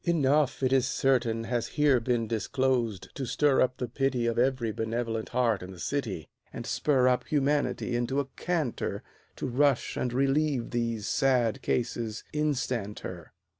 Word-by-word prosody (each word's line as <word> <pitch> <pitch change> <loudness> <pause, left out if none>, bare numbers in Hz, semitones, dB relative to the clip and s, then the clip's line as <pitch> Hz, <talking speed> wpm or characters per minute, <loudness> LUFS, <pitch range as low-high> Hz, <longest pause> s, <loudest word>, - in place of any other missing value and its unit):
Enough, 145 -5 +2
it 130 0 +3
is 130 -2 +3
certain, 125 -3 +1
Has 120 0 -1
here 145 -4 +5
been 120 -1 0
disclosed 115 -1 -1
to 135 - -4
stir 135 +3 +3
up 130 0 +1
the 125 - -3
pity 125 0 0
Of 115 0 0
every 125 -3 +1
benevolent 115 0 -2
heart 120 -4 +1
in 90 - -8
the 95 - -10
city, 110 - -3 0.2
And - - -7
spur 130 -4 +2
up 125 -1 +1
humanity 145 -3 0
into 120 +3 0
a 140 - 0
canter 165 -8 -2 0.3
To - - -4
rush 135 +1 +2
and 125 - -1
relieve 135 0 +1
these 115 -3 -1
sad 125 -5 +2
cases 115 -2 -2
instanter. 120 - -2
125 Hz, 155 wpm, -28 LUFS, 115-135 Hz, 0.3 s, here